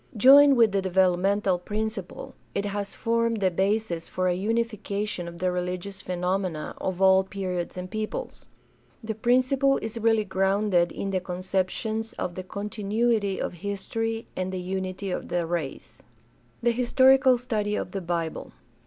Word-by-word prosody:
Joined 275 Hz, +4 st, +8 dB
with 225 Hz, -3 st, +5 dB
the 195 Hz, 0 st, +1 dB
developmental 190 Hz, +1 st, +2 dB
principle, 210 Hz, 0 st, -5 dB, 0.2 s
it 200 Hz, -, -1 dB
has 200 Hz, 0 st, -3 dB
formed 230 Hz, -1 st, 0 dB
the 190 Hz, -2 st, +2 dB
basis 190 Hz, -2 st, 0 dB
for 185 Hz, 0 st, -1 dB
a 180 Hz, -, +2 dB
unification 210 Hz, -2 st, -2 dB
of 170 Hz, 0 st, -8 dB
the 180 Hz, +1 st, 0 dB
religious 180 Hz, +2 st, -4 dB
phenomena 180 Hz, -2 st, -2 dB
of 190 Hz, 0 st, -1 dB
all 190 Hz, 0 st, +6 dB
periods 185 Hz, -3 st, -4 dB
and 180 Hz, 0 st, -4 dB
peoples. 215 Hz, -, -5 dB, 0.6 s
The 220 Hz, 0 st, -3 dB
principle 255 Hz, +4 st, +2 dB
is 225 Hz, +1 st, -5 dB
really 225 Hz, -1 st, +2 dB
grounded 190 Hz, -1 st, +2 dB
in 195 Hz, -, -4 dB
the 190 Hz, -, +1 dB
conceptions 190 Hz, +5 st, -2 dB
of 175 Hz, -, -4 dB
the 185 Hz, -, -5 dB
continuity 210 Hz, +1 st, -1 dB
of -, -, -3 dB
history 205 Hz, +5 st, -3 dB
and 185 Hz, -, -2 dB
of 185 Hz, -, -5 dB
the -, -, -4 dB
unity 190 Hz, +1 st, -4 dB
of -, -, -4 dB
the 175 Hz, -1 st, -1 dB
race. 155 Hz, -9 st, -5 dB, 0.6 s
The 240 Hz, -, +4 dB
historical 260 Hz, +2 st, +5 dB
study 215 Hz, -4 st, -2 dB
of 180 Hz, -, -3 dB
the 195 Hz, -, -4 dB
Bible. 170 Hz, -2 st, -3 dB
195 Hz, 155 wpm, -26 LUFS, 185-225 Hz, 0.6 s, Joined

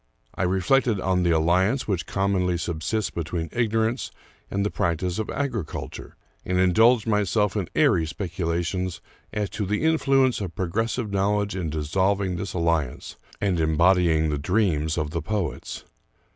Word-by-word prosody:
I -, -, -5 dB
reflected 100 Hz, +5 st, +2 dB
on 95 Hz, -1 st, +1 dB
the 90 Hz, -, +2 dB
alliance 90 Hz, -, +2 dB
which 90 Hz, -6 st, -1 dB
com 100 Hz, 0 st, 0 dB
monly 90 Hz, -2 st, +1 dB
subsists 85 Hz, +6 st, -2 dB
between 85 Hz, 0 st, -3 dB
ignorance 115 Hz, +1 st, 0 dB, 0.4 s
and 100 Hz, +1 st, -1 dB
the 105 Hz, -, -1 dB
practice 85 Hz, +3 st, -1 dB
of 110 Hz, -, -3 dB
agri 135 Hz, -8 st, -2 dB
culture, -, -, -8 dB, 0.3 s
and 90 Hz, -, -1 dB
indulged 110 Hz, +6 st, +4 dB
myself 105 Hz, -1 st, +1 dB
in 100 Hz, -5 st, -2 dB
airy 80 Hz, -1 st, +3 dB
speculations 85 Hz, +1 st, -2 dB, 0.3 s
as 105 Hz, -1 st, -1 dB
to 105 Hz, -, -3 dB
the 105 Hz, +7 st, -1 dB
influence 135 Hz, -6 st, +3 dB
of 95 Hz, -4 st, -5 dB
progressive 105 Hz, +4 st, -1 dB
knowledge 100 Hz, 0 st, 0 dB
in 90 Hz, -4 st, -2 dB
dissolving 95 Hz, +5 st, 0 dB
this 95 Hz, +1 st, -5 dB
alli 85 Hz, -4 st, +2 dB
ance -, -, -10 dB, 0.2 s
and 95 Hz, -4 st, 0 dB
embodying 80 Hz, 0 st, +3 dB
the 75 Hz, -1 st, -1 dB
dreams 80 Hz, -3 st, +1 dB
of 75 Hz, -2 st, -2 dB
the 85 Hz, 0 st, -2 dB
poets. 100 Hz, 0 st, -4 dB
95 Hz, 155 wpm, -25 LUFS, 85-105 Hz, 0.4 s, indulged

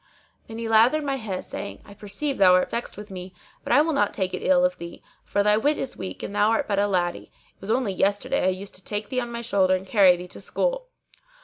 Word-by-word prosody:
Then 225 Hz, -, -8 dB
he 230 Hz, 0 st, -4 dB
lathered 230 Hz, +7 st, +4 dB
my 275 Hz, -1 st, -1 dB
head 205 Hz, -6 st, -5 dB
saying, 200 Hz, -, -7 dB
"I 200 Hz, -, -13 dB
perceive 210 Hz, +8 st, -4 dB
thou 185 Hz, -2 st, +7 dB
art 185 Hz, -, +1 dB
vexed 235 Hz, -3 st, -4 dB
with 210 Hz, 0 st, -9 dB
me, 185 Hz, 0 st, -8 dB, 0.3 s
but -, -, -4 dB
I 285 Hz, +5 st, +6 dB
will 325 Hz, 0 st, -1 dB
not 205 Hz, -8 st, +1 dB
take 190 Hz, -2 st, -2 dB
it -, -, -3 dB
ill 270 Hz, -1 st, +4 dB
of 270 Hz, 0 st, -1 dB
thee, 170 Hz, 0 st, -9 dB, 0.2 s
for 205 Hz, -, 0 dB
thy 210 Hz, 0 st, +4 dB
wit 290 Hz, +7 st, +1 dB
is 265 Hz, -, -4 dB
weak 190 Hz, -, -7 dB
and -, -, -5 dB
thou 210 Hz, +1 st, +3 dB
art 225 Hz, -, +1 dB
but 200 Hz, -1 st, 0 dB
a 205 Hz, -, +2 dB
laddy: 175 Hz, -3 st, -2 dB, 0.2 s
it -, -, -38 dB
was 195 Hz, -, -8 dB
only 230 Hz, -3 st, +1 dB
yesterday 205 Hz, +9 st, 0 dB
I -, -, +4 dB
used 190 Hz, +2 st, -5 dB
to 185 Hz, -, -14 dB
take 205 Hz, +1 st, -4 dB
thee 255 Hz, -, -1 dB
on 240 Hz, -1 st, -4 dB
my 235 Hz, 0 st, -4 dB
shoulder[FN#615] 190 Hz, -5 st, +2 dB
and 185 Hz, -, -10 dB
carry 190 Hz, -3 st, +5 dB
thee 180 Hz, +1 st, -8 dB
to -, -, -10 dB
school.' -, -, -1 dB
205 Hz, 260 wpm, -24 LUFS, 190-250 Hz, 0.3 s, thou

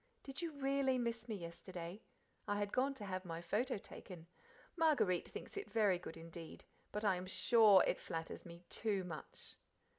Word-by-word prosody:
Did 270 Hz, +3 st, -5 dB
you 335 Hz, -2 st, -2 dB
REALLY 275 Hz, -2 st, +2 dB
miss 235 Hz, -1 st, -2 dB
me 220 Hz, -, -1 dB
yesterday? 175 Hz, +1 st, -7 dB, 0.5 s
I 205 Hz, -, +1 dB
had 205 Hz, 0 st, -1 dB
gone 275 Hz, +2 st, +2 dB
to 215 Hz, -6 st, -5 dB
have 185 Hz, -1 st, -3 dB
my 165 Hz, -2 st, -4 dB
photo 210 Hz, +9 st, 0 dB
taken. 180 Hz, -3 st, -9 dB, 0.5 s
Marguerite 265 Hz, -, +3 dB
thinks -, -, -8 dB
it 405 Hz, 0 st, -4 dB
very 205 Hz, -5 st, +3 dB
good 165 Hz, -2 st, -7 dB
indeed, 165 Hz, 0 st, -8 dB, 0.3 s
but 210 Hz, +1 st, -2 dB
I 190 Hz, -3 st, +4 dB
am 180 Hz, +1 st, -5 dB
SURE 200 Hz, +2 st, +7 dB
it -, -, +1 dB
flatters 165 Hz, -1 st, -4 dB
me 170 Hz, 0 st, -11 dB
TOO 205 Hz, -4 st, 0 dB
much. 160 Hz, -5 st, -8 dB
200 Hz, 175 wpm, -39 LUFS, 175-240 Hz, 0.5 s, SURE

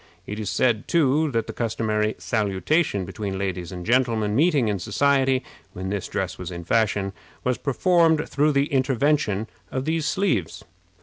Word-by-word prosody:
It 105 Hz, +1 st, -5 dB
is 105 Hz, -3 st, -3 dB
said, 120 Hz, -4 st, +1 dB
too, 155 Hz, -1 st, +3 dB
that 115 Hz, -4 st, -1 dB
the -, -, -7 dB
customary 110 Hz, -2 st, -1 dB
salutation 105 Hz, -, 0 dB
between 95 Hz, +1 st, -4 dB
ladies 95 Hz, -3 st, -3 dB
and 90 Hz, -1 st, -7 dB
gentlemen 115 Hz, -4 st, +2 dB
meeting 150 Hz, -4 st, +3 dB
in 100 Hz, -2 st, -1 dB
society, 135 Hz, +6 st, +2 dB, 0.3 s
when 95 Hz, +1 st, -5 dB
this 100 Hz, -1 st, -3 dB
dress 90 Hz, -1 st, -3 dB
was 90 Hz, -1 st, -5 dB
in 85 Hz, -1 st, -6 dB
fashion, 100 Hz, -1 st, +1 dB, 0.3 s
was 125 Hz, -2 st, 0 dB
performed 160 Hz, +3 st, +2 dB
through 150 Hz, +1 st, +2 dB
the 140 Hz, 0 st, +3 dB
intervention 130 Hz, -5 st, +1 dB, 0.2 s
of 130 Hz, 0 st, -3 dB
these 160 Hz, 0 st, 0 dB
sleeves. 175 Hz, -, -1 dB
115 Hz, 160 wpm, -24 LUFS, 100-140 Hz, 0.3 s, too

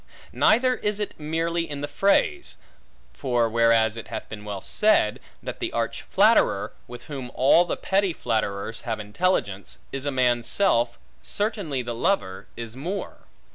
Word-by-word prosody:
Neither 250 Hz, +3 st, +4 dB
is 210 Hz, 0 st, -1 dB
it 210 Hz, -, -2 dB
merely 165 Hz, +2 st, -1 dB
in 145 Hz, -1 st, -5 dB
the 145 Hz, -, -2 dB
phrase; 200 Hz, -, +1 dB, 0.6 s
for 120 Hz, -4 st, +1 dB
whereas 115 Hz, -1 st, +3 dB
it 115 Hz, -, -7 dB
hath 110 Hz, 0 st, -6 dB
been 105 Hz, -1 st, -8 dB
well 105 Hz, -2 st, -5 dB
said, 210 Hz, -, +2 dB, 0.2 s
that -, -, -6 dB
the -, -, -2 dB
arch -, -, -2 dB
flatterer, -, -, +3 dB
with 120 Hz, 0 st, -10 dB
whom 135 Hz, -5 st, -6 dB
all 145 Hz, +7 st, +5 dB
the -, -, -3 dB
petty 195 Hz, -1 st, +1 dB
flatterers 110 Hz, -5 st, -2 dB
have 115 Hz, -2 st, -3 dB
intelligence, 105 Hz, -, -1 dB
is 135 Hz, +1 st, -4 dB
a -, -, +1 dB
man's 125 Hz, -3 st, +1 dB
self; 120 Hz, -12 st, +2 dB, 0.2 s
certainly 200 Hz, -, -2 dB
the 120 Hz, 0 st, -4 dB
lover 115 Hz, -, -1 dB
is 115 Hz, -1 st, -6 dB
more. 175 Hz, +9 st, -5 dB
130 Hz, 155 wpm, -25 LUFS, 115-180 Hz, 0.6 s, all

